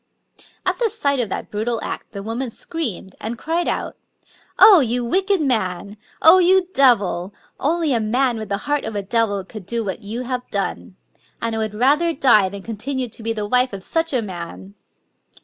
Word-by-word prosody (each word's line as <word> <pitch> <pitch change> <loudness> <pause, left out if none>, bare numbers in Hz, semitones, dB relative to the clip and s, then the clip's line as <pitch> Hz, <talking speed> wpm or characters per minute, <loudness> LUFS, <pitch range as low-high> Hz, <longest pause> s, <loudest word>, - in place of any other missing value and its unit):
At - - 0
the 470 -2 +2
sight 285 - 0
of 235 -4 -1
that - - -5
brutal 225 +2 -1
act,' - - -6
the 200 -3 -7
woman 235 +4 -3
screamed, 230 - -5
and 230 +2 -4
cried 330 +6 -1
out: - - -2 0.2
— - - -31
" - - -33
Oh, 410 -5 +9
you 245 -2 0
wicked 385 +8 +1
man 200 - -1
I - - -11 0.3
Oh, 330 +4 +8
you 370 0 +4
devil! 205 - +2 0.2
Only 320 0 +1
a 235 - +2
man 240 +2 +1
with 215 - -6
the 200 - 0
heart 295 0 0
of 220 - -5
a 200 - -2
devil 205 -2 0
could 195 0 -11
do 235 +1 -2
what 190 - -4
you 225 +5 -5
have 250 0 -3
done!... 200 -1 -3 0.4
And 230 0 -2
I - - -2
would 215 -1 -3
rather 295 +9 +3
die 235 -9 +4
than 200 0 -9
continue 250 +3 -4
to 225 - -12
be 225 +1 -2
the 210 -2 -3
wife 250 +1 +2
of 195 -1 -6
such 330 +6 -1
a 250 -4 0
man 100 - -8
235 Hz, 205 wpm, -21 LUFS, 205-280 Hz, 0.4 s, Oh